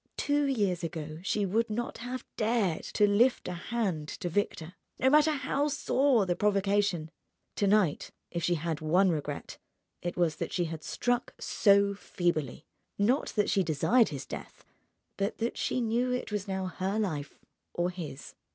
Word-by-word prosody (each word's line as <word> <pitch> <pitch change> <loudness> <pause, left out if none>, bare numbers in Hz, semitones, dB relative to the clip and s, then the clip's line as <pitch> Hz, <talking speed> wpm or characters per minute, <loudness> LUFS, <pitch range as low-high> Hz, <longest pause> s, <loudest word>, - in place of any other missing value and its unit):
Two 290 0 +1
years 200 -9 0
ago 155 -1 -5
she 200 +2 0
would 225 +5 +1
not 240 +3 -3
have 250 +2 -5
dared 215 -6 +1
to 210 - +2
lift 235 +5 +3
a 180 - -3
hand 180 -4 -2
to 175 +3 -4
Victor, 170 -2 -2 0.2
no 260 +1 +3
matter 300 +1 +6
how 285 0 0
sore 270 -5 +2
the 175 -1 0
provocation. 200 -5 +1 0.5
To 200 - +2
night—if 180 -3 0
she 175 - +2
had 160 -1 -3
one 180 +5 +3
regret 145 -2 -4 0.4
it 175 0 -4
was 170 -4 +1
that - - -3
she 175 - 0
had 160 -1 -6
struck 245 0 -1
so 200 -1 +4
feebly: 165 -8 -2 0.3
not 235 +8 +2
that 210 -2 +2
she 195 - +3
desired 185 - +3
his 140 -4 -6
death, - - -9 0.5
but 200 +1 -1
that 230 +1 -2
she - - -1
knew 240 +2 +1
it 250 -3 -2
was 210 -1 -2
now 190 -1 -2
her 190 +2 -2
life 155 -9 -2 0.4
or 175 +1 0
his. 165 -6 -8
200 Hz, 165 wpm, -30 LUFS, 170-230 Hz, 0.5 s, matter